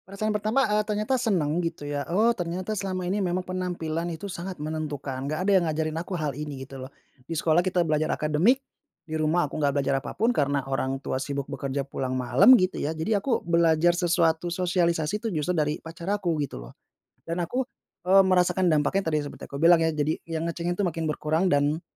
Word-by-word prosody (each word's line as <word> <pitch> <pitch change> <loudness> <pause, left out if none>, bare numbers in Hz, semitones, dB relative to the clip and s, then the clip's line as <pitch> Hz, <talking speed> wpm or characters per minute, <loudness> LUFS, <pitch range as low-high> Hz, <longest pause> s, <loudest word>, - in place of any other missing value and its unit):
Rasa 200 +2 -4
yang 215 - +1
pertama, 215 +6 +1
eee, 210 0 +2
ternyata 210 +3 -1
senang 180 - +1
gitu 165 -3 -4
ya 145 0 -2
oh 220 +7 +3
ternyata 180 +1 -3
selama 190 -3 -3
ini 195 +3 0
memang 185 0 -1
penampilan 175 -3 -3
itu 165 +3 -6
sangat 185 -1 -6
menentukan 145 -3 -4
gak 155 +5 -2
ada 200 - +3
yang - - -1
ngajarin 155 0 -1
aku 180 +1 -4
hal 150 -3 -2
ini 145 -1 -6
gitu 135 0 -10
loh, - - -10 0.4
di 165 - -2
sekolah 160 +1 +3
kita 180 -1 +1
belajar 155 0 0
akademik, 155 - +2 0.5
di 160 - -8
rumah 155 +2 +2
aku 150 +1 -5
gak 145 -1 +1
belajar 135 -1 +1
apa - - -8
pun 230 +5 +2
karena 140 - 0
orang 135 0 -1
tua 130 - -2
sibuk 140 -1 -3
bekerja 140 0 -3
pulang 130 -2 -3
malam 130 - +6
gitu 185 -3 0
ya 155 +2 -2
jadi 200 +6 0
aku 245 +2 -1
belajar 170 0 +3
sesuatu 170 -1 +1
sosialisasi 175 0 0
itu 230 - -2
justru 155 +4 0
dari 150 -2 0
pacar 165 +2 -8
aku 200 -4 0
gitu 140 - -4
loh, - - -13 0.5
dan 170 +2 -2
aku, 250 +10 -1 0.4
eee, 195 +2 +7
merasakan 185 -1 +3
dampaknya 160 +4 +1
tadi 155 - +1
seperti 145 - -9
aku 140 - -6
bilang 165 +2 +6
ya 165 - +3
jadi 155 0 0 0.2
yang 165 0 -2
ngecengin 170 +1 -2
itu 205 - +1
makin 165 -2 -2
berkurang 155 +4 0
dan 145 +2 +2
165 Hz, 210 wpm, -26 LUFS, 150-185 Hz, 0.5 s, eee